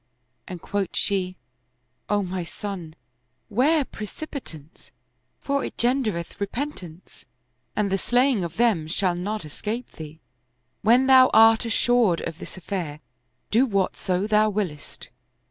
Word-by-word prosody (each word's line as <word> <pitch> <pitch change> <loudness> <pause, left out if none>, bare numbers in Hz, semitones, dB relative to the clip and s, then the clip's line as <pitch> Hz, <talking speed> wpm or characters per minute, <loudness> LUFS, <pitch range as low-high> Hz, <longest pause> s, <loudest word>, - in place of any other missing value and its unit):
And 180 -2 -7
quoth 200 -2 -2
she, 185 -2 0 0.4
" 125 +1 -47
O 205 -1 +2
my 185 -1 -3
son, 175 -3 -7 0.6
'ware 280 +7 +3
precipitance, 210 - -9 0.5
for 280 0 -1
it - - -6
gendereth 235 -9 -1
repentance 200 - -6 0.5
and 205 -2 0
the 195 - +1
slaying 245 -3 +2
of 170 -1 -6
them 215 -10 +2
shall 180 +2 0
not 195 +2 -4
escape 220 +10 -5
thee. 155 0 -10 0.6
When 240 +4 +5
thou 260 -1 +7
art 225 +1 +6
assured 230 -5 +2
of 165 - -6
this - - -9
aifair, 170 -5 -4 0.5
do 245 +5 +4
whatso 195 -2 0
thou 215 0 +3
wiliest." 190 -8 -5
200 Hz, 130 wpm, -24 LUFS, 175-235 Hz, 0.6 s, thou